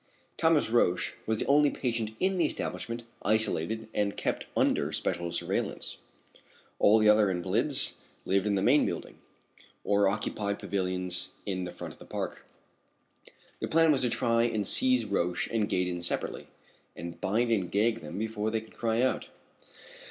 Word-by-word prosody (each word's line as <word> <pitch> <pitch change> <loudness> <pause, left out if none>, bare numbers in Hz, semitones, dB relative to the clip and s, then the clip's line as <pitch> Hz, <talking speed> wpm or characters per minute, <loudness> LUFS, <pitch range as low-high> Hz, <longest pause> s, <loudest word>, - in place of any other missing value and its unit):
Thomas 160 -7 +3
Roch 90 -7 +2
was 110 0 +1
the - - 0
only 145 +1 +5
patient 115 -5 -2
in 190 0 +1
the 165 - +4
establishment 115 -5 -3 0.2
isolated 110 0 +1
and 100 -1 0
kept - - -2
under - - +2
special 85 0 -2
surveillance. - - -3 0.8
All 105 +2 +6
the 110 -1 +4
other 105 -1 +6
invalids 95 +10 0 0.3
lived 100 +2 +1
in 100 - +2
the 95 - 0
main 145 +7 +5
building, - - -4 0.6
or 100 -1 +3
occupied 100 0 -1
pavilions 90 -2 -2 0.2
in 95 -2 -2
the 90 - -6
front - - -8
of - - -21
the - - -12
park. - - -4 1.2
The - - -2
plan 165 0 +4
was 140 - +2
to 125 - +2
try 115 0 +2
and 110 -3 0
seize 125 0 +3
Roch 90 -3 0
and 110 -2 0
Gaydon 90 -1 0
separately 85 - -1 0.5
and 85 +1 -8
bind 115 +5 +1
and 95 -6 +1
gag 115 +3 +2
them - - -7
before 110 0 -2
they 110 0 -1
could 110 - -17
cry 115 +1 +1
out. 130 - 0
110 Hz, 160 wpm, -29 LUFS, 95-120 Hz, 1.2 s, All